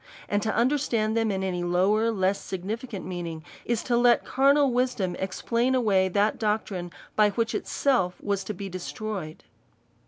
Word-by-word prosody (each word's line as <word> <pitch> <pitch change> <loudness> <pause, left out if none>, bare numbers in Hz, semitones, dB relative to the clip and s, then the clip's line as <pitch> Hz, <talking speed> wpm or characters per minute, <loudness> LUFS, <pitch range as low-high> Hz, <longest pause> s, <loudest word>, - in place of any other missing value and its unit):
And 205 0 0
to 220 +1 0
un 235 - +4
derstand 240 -6 0
them 225 -1 +1
in 190 -1 -1
any 180 -2 -2
lower, 195 +6 +2
less 195 -2 0
significant 205 +3 -5
meaning, 170 -3 -5 0.2
is 235 -2 -1
to 245 - 0
let 240 0 +4
carnal 275 +1 +4
wisdom 240 -8 0
explain 235 +6 0
away 200 -6 +3
that 205 +3 +1
doctrine, 210 -5 -1 0.3
by 210 -1 +5
which 225 +2 -1
itself 235 -11 +1
was 200 -1 -1
to 210 - -3
be 195 +2 -6
destroyed. 185 -2 -6
210 Hz, 160 wpm, -26 LUFS, 190-235 Hz, 0.3 s, by